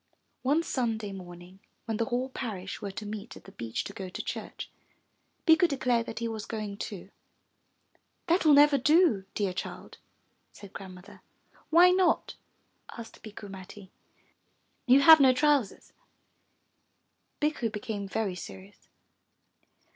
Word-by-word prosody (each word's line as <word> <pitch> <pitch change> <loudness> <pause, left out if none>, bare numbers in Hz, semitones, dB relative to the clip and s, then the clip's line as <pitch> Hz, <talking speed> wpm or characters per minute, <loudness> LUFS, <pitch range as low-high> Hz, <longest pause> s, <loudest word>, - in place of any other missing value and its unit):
One 290 +6 +2
Sunday 225 -8 -2
morning 180 0 -11 0.3
when 225 -2 -2
the 230 - 0
whole 255 +1 -2
parish 200 -8 -6
were 200 - -4
to 205 +2 -7
meet 210 +2 -7
at - - -15
the 195 - -14
beach 115 - -4
to 200 - -8
go 190 -2 -7
to - - -6
church, - - -6 0.8
Bikku 325 +1 +6
declared 250 -5 0
that 225 - -7
he 235 - -2
was 220 -2 -6
going 210 -3 -5
too. 200 -2 -7 1.1
That 350 +2 +2
will 305 -3 +6
never 290 -1 +6
do, 300 - +3
dear 200 -3 -1
child,'* - - -7 0.5
said 200 -2 -14
Grandmother. 185 -1 -11 0.5
'Why 350 +3 +7
not?" 365 -2 +2 0.6
asked 230 -1 -10
Bikku 210 -1 -10
Matti. 195 0 -11 1.0
You 260 +3 +6
have 320 +2 +9
no 265 -2 +6
trousers.'' 280 -6 0 1.5
Bikku 295 -6 0
became 210 -2 -5
very 200 0 -2
serious. 190 +3 -11
220 Hz, 135 wpm, -28 LUFS, 195-275 Hz, 1.5 s, have